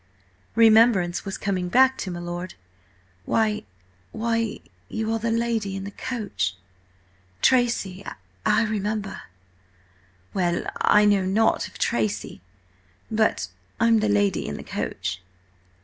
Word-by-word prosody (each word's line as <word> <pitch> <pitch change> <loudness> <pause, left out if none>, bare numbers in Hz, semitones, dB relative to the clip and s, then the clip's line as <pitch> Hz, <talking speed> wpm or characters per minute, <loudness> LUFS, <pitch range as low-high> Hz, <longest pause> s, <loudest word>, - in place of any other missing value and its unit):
Remembrance 220 -6 +5
was 195 -1 -4
coming 185 -3 -2
back 265 +4 +5
to 190 - -3
my 175 -1 -5
lord. 175 +1 -5 0.7
"Why–why–you 215 - -3
are 225 - 0
the 230 +1 -1
lady 225 -4 0
in 195 - -4
the 200 - -6 1.6
coach!–Tracy–I 195 - 0
remember!" 210 -1 -2 1.1
"Well, 175 -2 0
I 210 0 +5
know 205 -2 +4
nought 205 +4 +2
of - - -14
Tracy, 105 -5 -1 0.7
but 215 - +1 0.3
I'm 230 0 +4
the 215 0 +1
lady 205 -2 +1
in 70 - -4
the - - -8
coach." 95 0 -4
205 Hz, 105 wpm, -24 LUFS, 175-225 Hz, 1.6 s, Remembrance